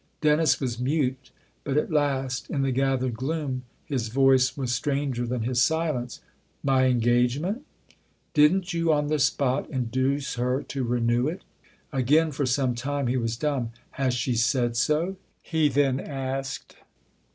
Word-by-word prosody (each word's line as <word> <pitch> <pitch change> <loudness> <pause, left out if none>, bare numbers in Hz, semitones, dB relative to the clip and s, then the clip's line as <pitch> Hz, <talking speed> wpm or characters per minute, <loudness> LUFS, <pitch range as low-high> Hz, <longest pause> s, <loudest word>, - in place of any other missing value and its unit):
Dennis 155 +1 +3
was 125 -4 -3
mute; 130 -1 -1 0.3
but 140 0 -1
at 150 - 0
last, 135 -4 0
in 140 -2 0
the 135 - +1
gathered 130 -1 0
gloom, 130 0 -3 0.2
his 130 -6 -2
voice 130 +2 +3
was 130 -3 -1
stranger 135 -2 -1
than 120 -1 -2
his 125 +1 +1
silence. 155 -6 0 0.2
" - - -41 0.2
My 135 -1 +3
engagement? 125 - +1 0.2
" - - -32
" - - -42
Didn't 175 +5 +3
you, 165 -1 +1
on 150 -1 +1
the 155 0 +1
spot, 135 -1 +1
induce 130 +3 -1
her 125 +3 0
to 135 -2 -4
renew 120 +1 +1
it?" 170 +5 -4 0.5
Again, 150 +5 +3
for 140 -1 -1
some 130 0 +1
time, 140 +3 -2
he 125 +2 +1
was 115 -1 -2
dumb. 130 -5 -1
" - - -37
Has 130 -2 +2
she 125 +1 0
said 120 +1 +1
so? 155 +10 +1
" - - -42
he 160 -2 +1
then 135 -1 +2
asked. 135 -1 -5
135 Hz, 165 wpm, -26 LUFS, 125-145 Hz, 0.5 s, Dennis